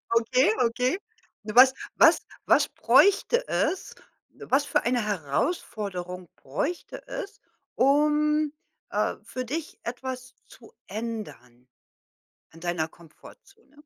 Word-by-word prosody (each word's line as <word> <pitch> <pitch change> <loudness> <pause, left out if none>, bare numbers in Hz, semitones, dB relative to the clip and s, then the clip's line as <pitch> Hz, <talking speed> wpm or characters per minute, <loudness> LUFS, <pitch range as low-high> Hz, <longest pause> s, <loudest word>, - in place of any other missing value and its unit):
Okay, 255 - +3
okay. 250 +9 0 0.4
Was 250 +5 +6 0.2
was - - +6 0.2
was - - +4
bräuchte 475 +5 +3
es 375 - -1 0.4
was 275 +3 +1
für 285 - +1
eine 240 -1 +1
Herausforderung 180 - -3
bräuchte 350 - -4
es, - - -7 0.4
um, 300 +2 +3 0.4
äh, - - 0
für 255 - -5
dich 310 +5 -5
etwas 255 +1 -6
zu - - -16 0.2
ändern 200 - -7 0.9
in 165 - -14
deiner 175 -2 -1
Komfortzone? 275 - -18
255 Hz, 100 wpm, -26 LUFS, 200-300 Hz, 0.9 s, Was